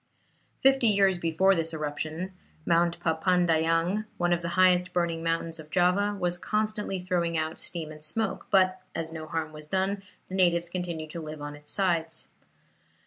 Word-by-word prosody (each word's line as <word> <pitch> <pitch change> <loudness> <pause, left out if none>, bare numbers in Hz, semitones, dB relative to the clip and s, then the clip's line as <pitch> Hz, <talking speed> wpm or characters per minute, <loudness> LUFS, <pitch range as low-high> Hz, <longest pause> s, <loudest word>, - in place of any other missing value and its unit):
Fifty 270 -2 +5
years 195 -3 +4
before 170 +4 +3
this 165 -2 -1
eruption, 155 +4 -4 0.3
Mount 170 0 +2
Papandayang, 165 +3 +2
one 175 0 +2
of 175 - 0
the 170 - -3
highest 180 -1 +4
burning 170 -2 0
mountains 165 0 -1
of 155 -1 -11
Java, 195 +4 +2
was 175 -1 0
constantly 210 -2 -1
throwing 175 -2 0
out 160 0 -2
steam 160 -3 -5
and 150 0 -11
smoke, 210 +7 -2
but 185 -1 +3
as 165 0 -3
no 160 -1 -7
harm 155 0 -3
was 150 0 -9
done, 190 +3 0 0.3
the - - -10
natives 175 -2 +3
continued 170 -3 -4
to 170 - -6
live 155 -1 -7
on 145 0 -6
its 150 0 -7
sides. 170 -4 0
170 Hz, 165 wpm, -28 LUFS, 160-185 Hz, 0.3 s, Fifty